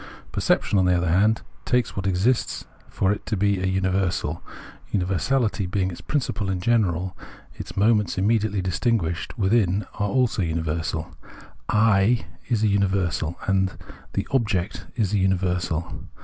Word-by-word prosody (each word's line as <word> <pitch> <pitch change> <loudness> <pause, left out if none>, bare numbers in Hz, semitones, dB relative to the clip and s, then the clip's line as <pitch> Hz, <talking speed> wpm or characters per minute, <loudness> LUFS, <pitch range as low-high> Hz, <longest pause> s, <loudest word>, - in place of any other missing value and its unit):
Perception, 100 - +2
on 95 - +3
the 90 0 +4
other 85 0 0
hand, 105 +5 +3 0.2
takes 125 -1 0
what 95 0 -2
exists 95 +7 +1 0.2
for 95 - +1
it 105 - -3
to 110 - -1
be 100 -1 +1
a 95 - 0
universal. 95 -4 0 0.5
Universality 100 +3 0
being 95 0 0
its 85 - -9
principle 115 -8 -2
in 95 -1 -1
general, 95 -4 +1 0.4
its - - -9
moments 105 -2 +3
immediately 105 -1 +1
distinguished 90 -2 -1
within 100 -2 +2
it - - -18
are 105 0 +1
also 125 -4 +1
universal; 80 0 -2 0.6
7 110 +1 +3 0.2
is 115 -3 +1
a - - +4
imiversal, 95 -4 0
and 95 -1 +1 0.4
the - - -2
object 105 -7 0
is 110 -5 0
a 105 - +3
universal. 90 -3 -1
95 Hz, 145 wpm, -24 LUFS, 90-110 Hz, 0.6 s, the